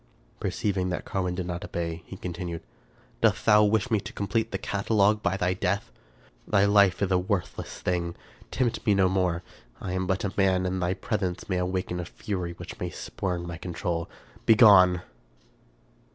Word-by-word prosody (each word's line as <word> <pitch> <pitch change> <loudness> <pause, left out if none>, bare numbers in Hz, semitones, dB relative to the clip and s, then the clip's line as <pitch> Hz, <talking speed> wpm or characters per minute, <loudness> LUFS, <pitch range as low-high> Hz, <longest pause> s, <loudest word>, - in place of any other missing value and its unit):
Perceiving 95 -3 -1
that 90 - -3
Carwin 90 -2 -2
did 90 -1 -3
not 90 0 -4
obey, 85 -1 -4
he 95 - -8
continued, 85 -2 -5 0.3
" - - -32
Dost - - +2
thou 105 0 +6
wish 110 +4 +2
me 110 - +3
to - - -8
complete 110 +3 -1
the 95 - -1
catalogue 105 +1 +1
by 95 -1 0
thy 90 -1 +1
death? 90 -7 -1 0.6
Thy 100 0 +4
life 100 -2 +4
is 95 - 0
a 90 - +4
worthless 95 -1 -3
thing. 85 -2 -1 0.3
Tempt 120 -3 -1
me 105 - +5
no 95 -1 +4
more. 90 -2 0 0.4
I 90 - -5
am 95 0 -1
but 95 -1 0
a 95 - -3
man, 95 -2 +2
and 90 0 -1
thy 90 +1 0
presence 95 -2 -3
may 95 -3 0
awaken 90 -1 -2
a 90 - -3
fury 90 -1 -4
which - - -9
may - - -2
spurn 90 -2 -4
my 85 -1 -6
control. 85 -1 -3 0.4
Begone 100 -6 +7
95 Hz, 180 wpm, -27 LUFS, 90-100 Hz, 0.6 s, Begone